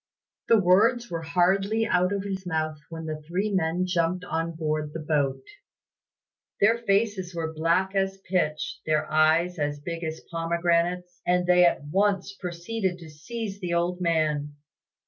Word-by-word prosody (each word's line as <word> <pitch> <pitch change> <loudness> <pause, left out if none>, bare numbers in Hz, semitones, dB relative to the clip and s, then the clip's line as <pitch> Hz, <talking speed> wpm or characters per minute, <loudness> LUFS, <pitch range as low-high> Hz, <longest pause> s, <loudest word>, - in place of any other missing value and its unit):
The 230 - +6
words 215 +5 +3
were 165 -1 -2
hardly 195 +6 +2
out 180 -3 +2
of 200 -1 -1
his 195 -1 -4
mouth 155 -2 -2
when 165 -1 -7
the 155 -1 -5
three 180 +7 -2
men 180 -1 +1
jumped 180 0 0
on 165 0 -2
board 155 -1 -2
the 165 - -4
boat. 150 -3 0 1.2
Their 225 +3 +4
faces 200 -4 0
were 160 -1 -3
black 170 +4 +1
as 195 0 0
pitch, 175 -5 -2
their 155 0 +2
eyes 160 +3 +3
as 145 0 -1
big 170 +3 -5
as 160 0 -5
pomegranates, 170 +1 0
and 180 0 +2
they 180 0 +6
at 160 - 0
once 195 +5 0
proceeded 180 +1 -3
to 165 -3 -12
seize 200 +6 -6
the 175 -3 -2
old 175 +1 0
man. 155 -4 0
175 Hz, 155 wpm, -26 LUFS, 160-190 Hz, 1.2 s, The